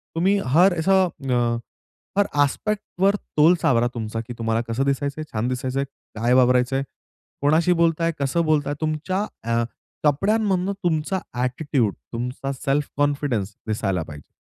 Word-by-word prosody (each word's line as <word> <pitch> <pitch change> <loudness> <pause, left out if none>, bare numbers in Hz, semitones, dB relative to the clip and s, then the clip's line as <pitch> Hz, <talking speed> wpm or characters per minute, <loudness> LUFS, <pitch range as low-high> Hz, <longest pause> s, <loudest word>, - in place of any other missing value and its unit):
तुम्ही 190 +5 +3
हर, 175 +9 +5
अस 160 +4 0
अ, 135 -11 +2 0.6
हर, 205 - +5 0.2
आस्पेक्टवर 200 +4 0 0.2
तोल 160 +4 +6
सावरा 120 -2 +3
तुमचा 115 -1 -4
की 120 - -5
तुम्हाला 115 0 0
कसं 115 +4 0
दिसायचंय? 140 +2 -1
छान 110 +2 0
दिसायचंय, 130 +1 -1 0.3
काय 120 +3 +2
वावरायचंय? 125 +1 +3 0.6
कोणाशी 160 +5 +4
बोलताय? 165 0 +2
कसं 140 +5 +1
बोलताय? 145 -2 +1
तुमच्या 160 +6 -1 0.2
अ, 115 +1 +1 0.4
कपड्यांमधून 195 +4 +2
तुमचा 170 +2 0 0.2
ॲटिट्यूड, 125 - 0 0.2
तुमचा 125 +3 -3
सेल्फ 140 +2 -1
कॉन्फिडन्स 140 -8 0
दिसायला 95 -5 -1
पाहिजे. 75 -2 -12
140 Hz, 130 wpm, -23 LUFS, 120-170 Hz, 0.6 s, तोल